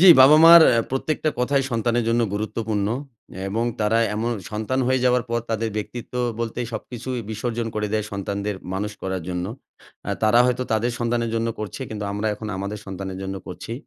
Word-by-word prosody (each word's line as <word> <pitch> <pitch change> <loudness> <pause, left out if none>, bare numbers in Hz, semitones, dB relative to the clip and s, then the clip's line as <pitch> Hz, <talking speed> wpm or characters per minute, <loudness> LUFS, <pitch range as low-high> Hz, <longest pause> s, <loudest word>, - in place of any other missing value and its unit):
জি 190 - +8
বাবা-মার 160 +5 +9
আ 115 - +3
প্রত্যেকটা 155 +3 0
কথাই 135 +2 +2
সন্তানের 120 0 +1
জন্য 115 +1 +2
গুরুত্বপূর্ণ। 110 -1 -2 0.6
এবং 115 +4 -1 0.2
তারা 110 +2 +3 0.2
এম 110 - -2 0.3
সন্তান 110 +5 -1
হয়ে 130 0 +2
যাওয়ার 125 -1 +3
পর 120 - +1
তাদের 115 0 0
ব্যক্তিত্ব 120 +3 -6 0.3
বলতে 115 0 -3
সবকিছুই 120 +2 -5
বিসর্জন 115 +1 -2
করে 105 0 -1
দেয় 110 -1 0
সন্তানদের 100 0 -3 0.2
মানুষ 105 +2 -2
করার 95 -2 -3
জন্য। 90 -1 -2 0.6
আ - - 0
তারা 110 +2 +5
হয়তো 125 0 +1
তাদের 115 +2 +1
সন্তানের 115 -1 0
জন্য 115 0 0
করছে 110 +5 -6
কিন্তু 105 -1 -4
আমরা 105 +2 -2
এখন 110 0 -7
আমাদের 100 +2 -4
সন্তানের 95 0 -6
জন্য 95 0 -4
করছি। 90 +5 -7
115 Hz, 175 wpm, -23 LUFS, 105-120 Hz, 0.6 s, বাবা-মার